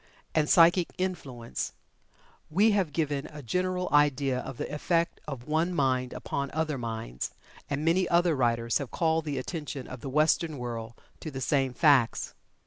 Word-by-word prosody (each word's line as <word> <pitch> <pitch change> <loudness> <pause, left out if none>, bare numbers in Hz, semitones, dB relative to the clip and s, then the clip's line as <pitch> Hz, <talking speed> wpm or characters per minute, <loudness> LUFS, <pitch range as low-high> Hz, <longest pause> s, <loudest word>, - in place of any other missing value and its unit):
and 150 -1 +2
"Psychic 170 +1 +6
Influence," 140 -11 -4 0.8
we 200 +8 +4
have 195 -6 +1
given 145 -2 -1
a 150 -1 -10
general 180 +7 -1
idea 140 -3 +3
of 130 -1 -7
the - - -3
effect 170 +3 0
of 135 -3 -6
one 165 +4 +1
mind 130 -3 +1
upon 140 0 -3
other 155 -3 -1
minds, 110 - -4 0.3
and 145 +2 -2
many 175 +2 +3
other 170 -1 +3
writers 115 -2 +1
have 140 -4 -5
called 160 -1 +1
the 145 -3 -2
attention 140 -1 -5
of 130 - -8
the 135 - -5
Western 155 +2 +2
world 115 -2 -5 0.2
to 160 - -6
the 135 -3 -6
same 135 0 +1
facts. 140 -7 +3
145 Hz, 160 wpm, -28 LUFS, 130-165 Hz, 0.8 s, Psychic